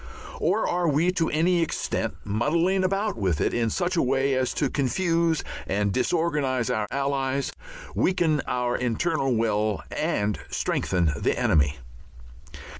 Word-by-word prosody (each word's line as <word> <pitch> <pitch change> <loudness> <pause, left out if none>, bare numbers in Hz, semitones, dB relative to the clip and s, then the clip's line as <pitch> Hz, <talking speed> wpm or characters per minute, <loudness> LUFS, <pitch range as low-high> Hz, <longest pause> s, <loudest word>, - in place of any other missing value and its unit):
Or 195 +7 +1
are 175 0 0
we 155 +5 +2
to 165 -3 0
any 170 +3 +2
extent 165 - -2
muddling 165 - +1
about 195 - 0
with 95 -8 0
it - - +1
in 115 -1 +1
such 180 - -1
a 170 - +3
way 135 +1 +1
as 130 -1 +1
to 145 - +1
confuse 165 +4 +1 0.2
and 100 0 0
disorganize 135 -4 0
our 105 -1 -1
Allies, 140 0 -1 0.4
weaken 165 -5 +2
our 125 0 0
internal 135 +2 0
will, 110 -2 0
and 105 - -1
strengthen 85 -4 0
the - - 0
enemy? 70 -1 +2
140 Hz, 135 wpm, -25 LUFS, 115-170 Hz, 0.4 s, a